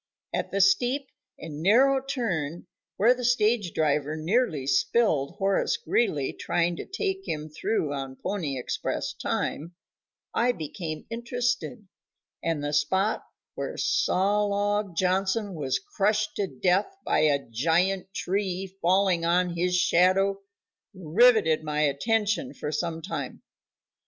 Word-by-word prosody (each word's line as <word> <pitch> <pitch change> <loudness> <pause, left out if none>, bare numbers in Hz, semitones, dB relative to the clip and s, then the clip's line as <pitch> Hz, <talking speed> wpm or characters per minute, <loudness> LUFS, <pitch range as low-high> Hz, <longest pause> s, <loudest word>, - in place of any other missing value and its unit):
At - - -2
the 195 - 0
steep 245 +8 +2 0.3
and 155 -2 -8
narrow 265 +9 +4
turn 180 - -3 0.3
where 230 +5 +5
the 250 0 -7
stage 225 -5 +2
driver 150 -1 0
nearly 165 - 0
spilled 140 - +1
Horace 195 0 +1
Greeley 150 - 0
trying 170 0 0
to - - -7
take 385 -1 -3
him 155 0 -3
through 155 -1 -1
on 135 -1 -5
pony 155 -5 -3
express 125 - -3
time, 170 +4 -3 0.6
I 245 +1 +2
became 155 -2 -6
interested, 240 -1 -2 0.5
and 165 -3 -1
the 145 0 -2
spot 190 +9 +1 0.3
where - - -5
Sawlog 205 0 +1
Johnson 190 +3 0
was 145 -5 -1
crushed 215 - -1
to 200 - 0
death 180 - +1
by - - +2
a 145 -2 +2
giant 175 +10 +1
tree 190 -1 -2
falling 185 -1 +3
on 175 +1 +1
his 180 +1 +1
shadow 195 +3 +3 0.5
riveted 185 -2 +4
my 150 -1 -1
attention 215 - 0
for 150 - -4
some 165 +1 -3
time. - - -5
185 Hz, 125 wpm, -26 LUFS, 155-215 Hz, 0.6 s, where